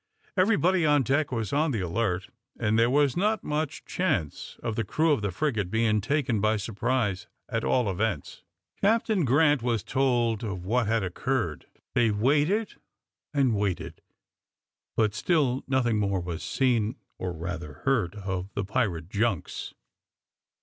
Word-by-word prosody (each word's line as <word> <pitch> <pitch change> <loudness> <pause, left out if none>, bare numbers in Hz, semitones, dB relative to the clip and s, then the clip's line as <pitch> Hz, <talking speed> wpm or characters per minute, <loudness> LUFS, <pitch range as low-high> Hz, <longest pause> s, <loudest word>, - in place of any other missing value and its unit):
Everybody 185 -2 +3
on 150 -3 +4
deck 140 +3 +1
was 115 -5 -2
on 155 +3 +2
the 115 -8 -1
alert, 90 +1 -1 0.3
and 110 -1 +2
there 115 +1 +4
was 140 0 +3
not 210 +4 +1
much 150 -1 -3
chance 120 - -2
of 115 -2 -2
the 115 - 0
crew 155 - +1
of 140 - +2
the 100 - -1
frigate 105 - -1
being 110 0 +2
taken 130 -2 0
by 110 +1 +2
surprise 105 -1 -1 0.2
at - - -2
all 125 -4 +2
events. 95 -4 -2 0.4
Captain 215 -4 +2
Grant 145 +1 +4
was 115 -3 0
told 120 -5 +1
of 95 -5 -4
what 115 +2 +1
had 110 -1 +1
occurred; 95 - -2 0.3
they 120 -2 +3
waited 145 - +1 0.5
and 135 -5 +2
waited, 90 -5 -2 1.0
but 110 -2 +3
still 135 +1 +1
nothing 125 -5 +2
more 100 -2 +1
was 85 -1 -5
seen, 120 -3 +1 0.2
or 90 - -2
rather 85 -2 -6
heard, 110 -9 +1
of 95 -1 -4
the 100 - -1
pirate 95 -7 -1
junks. 105 -2 -2
115 Hz, 150 wpm, -27 LUFS, 100-140 Hz, 1.0 s, on